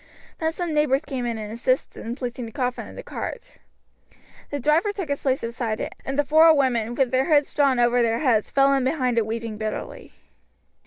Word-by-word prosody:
Then 320 Hz, -1 st, 0 dB
some 340 Hz, -1 st, -3 dB
neighbours 300 Hz, -1 st, +2 dB
came 255 Hz, -4 st, -3 dB
in 230 Hz, -1 st, -2 dB
and 215 Hz, 0 st, -6 dB
assisted 255 Hz, +3 st, -1 dB
in 230 Hz, +2 st, -4 dB
placing 245 Hz, -2 st, -5 dB
the -, -, -10 dB
coffin 250 Hz, 0 st, -3 dB
in -, -, -12 dB
the -, -, -8 dB
cart. -, -, -7 dB, 0.9 s
The 285 Hz, -, -3 dB
driver 305 Hz, -, +2 dB
took 385 Hz, -6 st, -5 dB
his 280 Hz, -, -2 dB
place 265 Hz, -1 st, 0 dB
beside 230 Hz, -1 st, -3 dB
it, -, -, -4 dB
and 270 Hz, +1 st, -4 dB
the 290 Hz, -, +2 dB
four 315 Hz, +3 st, +6 dB
women, 240 Hz, -4 st, +1 dB
with 260 Hz, -2 st, +1 dB
their 260 Hz, +1 st, +2 dB
hoods 290 Hz, -2 st, +3 dB
drawn 275 Hz, -3 st, +3 dB
over 240 Hz, 0 st, +3 dB
their 230 Hz, -1 st, +2 dB
heads, 235 Hz, -6 st, +1 dB
fell 275 Hz, 0 st, +4 dB
in 270 Hz, -1 st, +1 dB
behind 255 Hz, -3 st, +1 dB
it 220 Hz, -, -1 dB
weeping 225 Hz, -1 st, -4 dB
bitterly. 215 Hz, -1 st, -5 dB
255 Hz, 210 wpm, -24 LUFS, 235-285 Hz, 0.9 s, four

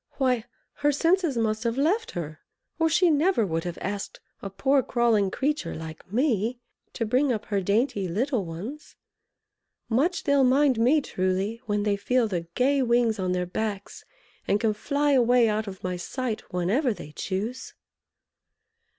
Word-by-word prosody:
Why, 250 Hz, -4 st, 0 dB, 0.3 s
her 290 Hz, 0 st, +2 dB
senses 330 Hz, -1 st, +1 dB
must 220 Hz, 0 st, 0 dB
have 235 Hz, +1 st, -1 dB
left 370 Hz, +11 st, +1 dB
her 155 Hz, -3 st, -5 dB, 0.4 s
or 325 Hz, 0 st, +3 dB
she 345 Hz, +1 st, +4 dB
never 305 Hz, -, +2 dB
would 165 Hz, -2 st, -2 dB
have 175 Hz, -1 st, -4 dB
asked 200 Hz, +1 st, -4 dB, 0.2 s
a 195 Hz, -, -5 dB
poor 270 Hz, +8 st, +2 dB
crawling 230 Hz, -5 st, +2 dB
creature 275 Hz, -, -2 dB
like 160 Hz, +3 st, -9 dB
me 240 Hz, -1 st, +1 dB, 0.3 s
to 230 Hz, -, -2 dB
bring 255 Hz, +5 st, +2 dB
up 220 Hz, -3 st, -2 dB
her 200 Hz, -2 st, -1 dB
dainty 205 Hz, 0 st, 0 dB
little 230 Hz, -, 0 dB
ones! 195 Hz, -, -8 dB, 0.9 s
Much 290 Hz, +10 st, +1 dB
they'll 280 Hz, -1 st, +3 dB
mind 260 Hz, -1 st, +3 dB
me, 265 Hz, +7 st, +4 dB
truly, 190 Hz, +1 st, -2 dB
when 205 Hz, -1 st, 0 dB
they 205 Hz, -1 st, +1 dB
feel 245 Hz, +3 st, +1 dB
the 175 Hz, -5 st, -3 dB
gay 270 Hz, +2 st, +2 dB
wings 235 Hz, -3 st, +2 dB
on 185 Hz, -1 st, 0 dB
their 180 Hz, 0 st, -1 dB
backs, 200 Hz, +2 st, -4 dB, 0.4 s
and 205 Hz, -, +2 dB
can 220 Hz, -1 st, +1 dB
fly 285 Hz, +6 st, 0 dB
away 245 Hz, -2 st, +4 dB
out 215 Hz, 0 st, -1 dB
of 190 Hz, -1 st, -8 dB
my 180 Hz, -1 st, -2 dB
sight 230 Hz, +5 st, -4 dB
whenever 210 Hz, -, +1 dB
they 150 Hz, -, -10 dB
choose!" 205 Hz, +10 st, -4 dB
230 Hz, 160 wpm, -26 LUFS, 195-270 Hz, 0.9 s, she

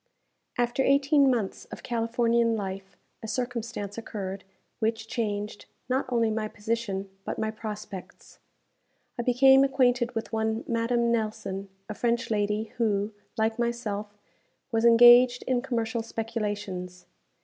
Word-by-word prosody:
After 240 Hz, +2 st, +1 dB
eighteen 280 Hz, +1 st, +4 dB
months 225 Hz, -6 st, -1 dB
of -, -, -10 dB
Californian 230 Hz, 0 st, +1 dB
life, 195 Hz, -1 st, -6 dB, 0.2 s
a 220 Hz, -, -6 dB
circumstance 230 Hz, -3 st, -4 dB
occurred, 195 Hz, -3 st, -6 dB, 0.4 s
which 220 Hz, 0 st, -1 dB
changed, 210 Hz, -3 st, -3 dB, 0.2 s
not 260 Hz, +2 st, 0 dB
only 230 Hz, -3 st, +2 dB
my 215 Hz, 0 st, -1 dB
position, 210 Hz, -2 st, -3 dB, 0.2 s
but -, -, -4 dB
my 220 Hz, 0 st, -1 dB
prospects. 215 Hz, -3 st, -8 dB, 0.8 s
I -, -, +2 dB
became 265 Hz, +2 st, +6 dB
acquainted 250 Hz, -3 st, +2 dB
with 225 Hz, 0 st, -4 dB
one 220 Hz, +1 st, 0 dB
Madame 235 Hz, 0 st, +1 dB
Nelson, 215 Hz, -3 st, -2 dB, 0.2 s
a 215 Hz, -, -4 dB
French 235 Hz, +1 st, -1 dB
lady 210 Hz, +1 st, 0 dB
who, 210 Hz, -3 st, +1 dB, 0.3 s
like 220 Hz, +1 st, 0 dB
myself, 215 Hz, -4 st, -3 dB, 0.5 s
was 225 Hz, 0 st, +1 dB
engaged 240 Hz, +1 st, +7 dB
in 255 Hz, -1 st, 0 dB
commercial 230 Hz, -3 st, -2 dB
speculations. 205 Hz, -5 st, -4 dB
225 Hz, 125 wpm, -27 LUFS, 210-240 Hz, 0.8 s, engaged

